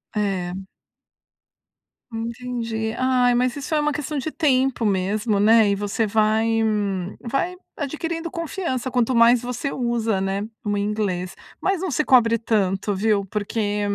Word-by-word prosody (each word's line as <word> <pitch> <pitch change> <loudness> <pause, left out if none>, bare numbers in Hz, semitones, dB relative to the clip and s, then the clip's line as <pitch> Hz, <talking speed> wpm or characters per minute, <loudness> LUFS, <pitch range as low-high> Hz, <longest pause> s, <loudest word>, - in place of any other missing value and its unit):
É. 195 -4 -1 1.6
Entendi. 230 -1 -3
Ai, 255 -1 +3
mas 250 +1 +1
isso 290 +2 -5
é 305 - +3
uma 300 0 +1
questão 300 0 -3
de 310 +4 -3
tempo 265 -6 +1
mesmo, 205 +2 +1
né. 220 0 +5
E 200 - +2
você 205 +3 -1
vai 220 +1 +2 0.8
vai 310 +10 -1 0.2
adquirindo 325 +3 -4
confiança, 330 -7 -3
quanto 250 0 +1
mais 235 +1 +6
você 250 +3 -3
usa, 230 -5 0
né, 195 +2 -2 0.2
o 205 -2 -1
inglês. 200 -3 -2 0.3
Mas 385 -2 0
não 375 - -2
se 305 +1 +1
cobre 230 -3 +5
tanto, 205 -3 0
viu, 200 0 +1
porque 205 +1 -2
230 Hz, 140 wpm, -23 LUFS, 210-260 Hz, 1.6 s, mais